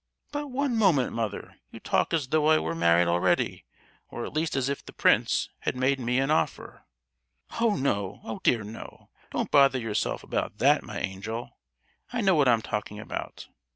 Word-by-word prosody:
"But, 290 0 -3
one 270 -1 -1
moment, 180 - +3
mother; 110 -3 -4
you - - -11
talk - - 0
as 150 -6 0
though 155 -1 +2
I 155 0 +6
were 80 - -2
married 85 +1 +3
already, 85 +1 +1 0.4
or - - -5
at - - -8
least 155 0 -1
as 130 -1 0
if 140 0 -3
the - - -11
prince - - +2
had - - -2
made 130 +2 +1
me 125 0 0
an 135 +2 +1
offer!" 155 - -2 0.7
"Oh, 230 -2 +3
no—oh 105 -4 -2
dear, 115 -3 +2
no! 105 +2 -11 0.2
don't - - -3
bother 135 -2 +5
yourself 115 -4 -2
about 105 - -3
that, 145 +6 +4
my 105 -4 -8
angel! 105 +5 -5 0.6
I 245 -1 -1
know 190 -2 +4
what 145 -5 +3
I'm 115 -2 +3
talking 105 0 -4
about! 110 - -7
130 Hz, 180 wpm, -27 LUFS, 105-155 Hz, 0.7 s, I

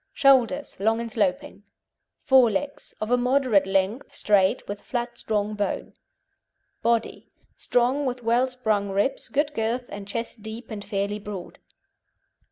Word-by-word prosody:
SHOULDERS 275 - +3
Long 225 +3 +2
and 235 -1 -4
sloping. 200 -2 -1 0.6
FORE 265 -5 +6
LEGS 280 +8 -4
Of 215 +2 -3
a 245 - +5
moderate 250 -6 +3
length, 195 +6 -1
straight, 195 -2 +2
with 205 0 -5
flat 240 -1 -3
strong 210 -1 -1
bone. 205 -2 -3 0.9
BODY 230 -1 0 0.3
Strong, 255 +4 +1
with 250 -1 -4
well 240 +3 +3
sprung 220 -6 -1
ribs, 200 +7 -1
good 290 +1 0
girth, 235 +1 -1
and 205 -1 -8
chest 230 +1 -4
deep 220 +2 -8
and 205 -2 -5
fairly 200 0 -2
broad. 200 -3 -8
225 Hz, 140 wpm, -25 LUFS, 205-250 Hz, 0.9 s, FORE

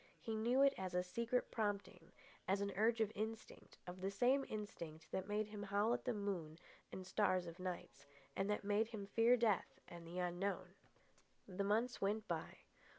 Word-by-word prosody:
He 225 -2 -3
knew 240 +5 +4
it 275 0 +6
as 185 -1 -3
a 180 - +3
secret 235 +6 -1
prompting, 200 -5 -2 0.4
as 195 +2 +3
an 200 0 -1
urge 225 +3 +3
of 215 -1 +2
instinct—of 215 -4 -6
the 190 - 0
same 250 +7 +3
instinct 170 -7 -6
that 190 0 -2
made 210 +1 +1
him 210 -1 -6
howl 205 +3 +2
at - - -2
the 250 - +1
moon 180 -7 -3 0.3
and 185 - -6
stars 185 -2 +2
of 170 +1 -8
nights, 175 -6 -5 0.3
and 195 +1 0
that 210 - 0
made 205 +2 +2
him 215 -3 -5
fear 230 +4 +5
death 220 -6 +1
and 170 -1 -9
the 175 +2 -6
unknown. 180 +2 -1 0.7
The 195 0 -2
months 225 +5 +1
went 210 +2 0
by. - - -3
200 Hz, 180 wpm, -40 LUFS, 185-220 Hz, 0.7 s, it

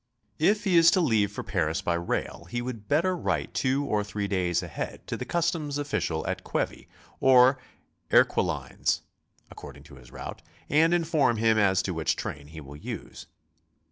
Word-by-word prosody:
If 205 +6 +3
he 190 -4 +3
is 165 0 +8
to - - +4
leave 110 - +2
for - - -6
Paris 80 -5 -1
by 85 - +1
rail, 85 0 -3
he 120 - -2
would 120 -4 -6
better 170 - +2
write 90 - -2
two 135 +2 0
or 105 -5 0
three 105 0 -4
days 90 -2 0
ahead 85 - -6
to - - -4
the - - -5
customs 165 -4 -1
official 90 - -2
at - - -3
Quevy - - -3 0.3
or 130 0 +6 0.5
Erquelinnes - - +2 0.5
(according - - -11
to 70 - -15
his 60 -2 -15
route) - - -8 0.3
and 165 +3 +4
inform 155 -8 +2
him 110 0 +3
as 95 -2 +3
to 95 - -2
which 80 -1 0
train 70 -1 -6
he 80 +1 -10
will 70 -1 -10
use. - - -8
110 Hz, 170 wpm, -27 LUFS, -, 0.5 s, is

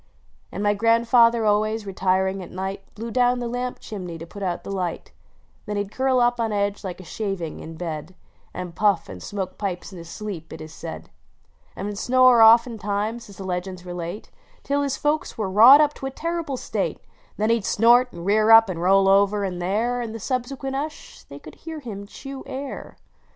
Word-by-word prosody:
" - - -36
And 200 - -4
my 205 0 +3
grandfather 230 +1 +4
always, 215 +1 +1
retiring 190 0 0
at 180 - -9
night, 190 +1 -5
P>lew 230 +2 -6
down 250 0 +3
the 245 -1 -3
lamp 245 +1 -3
chimney 180 -5 -7
to 165 - -8
put 200 +4 -11
out 180 -3 -2
the - - -6
light; 180 -4 -4 0.3
" - - -36
Then 210 0 -2
he 205 - +1
d 200 - -12
curl 260 +1 +1
up 240 0 +2
on 225 -1 0
edge 205 0 -1
like 185 -2 -6
a - - -9
shaving, 195 -4 -4
in 165 +1 -9
bod, 165 +1 -6 0.4
And 180 -1 -6
puff 200 -1 +1
and 90 -1 -9
smoke 190 - -5
pipes 195 -2 -4
in 180 - -9
his 165 -1 -10
sloe]), 205 -3 -6
it 160 - -9
is 155 0 -9
said: 165 0 -8 0.3
" - - -37
And - - -5
would 205 -1 -4
snore 255 -2 +5
oftentimes, 225 -1 +3
as 200 - -13
the 195 - -7
legends 180 0 -4
relate, 175 +2 -6 0.3
Till 285 +1 0
his 280 -1 -1
folks 300 +1 -1
were 205 -4 -2
wrought 240 +9 +9
up 295 -1 +2
to 270 - -6
a - - -2
terrible 330 -1 -3
state, - - -3 0.4
Then 215 +2 +1
he 230 - +3
d - - -8
snort, 240 +5 +4
and 170 - -9
rear 215 +2 +3
up, 225 -1 +8
and 170 -2 -4
roll 195 +2 +4
over: 200 +1 +3
and 180 -2 -3
there, 225 +7 0
In 225 -2 -5
the 225 - -6
subsequent 265 +4 -3
hush 300 +3 -6
they - - -11
could - - -12
hear 320 -1 -8
him 205 -7 -8
chew 270 +4 -9
air. 270 +1 -7
210 Hz, 215 wpm, -23 LUFS, 190-245 Hz, 0.4 s, wrought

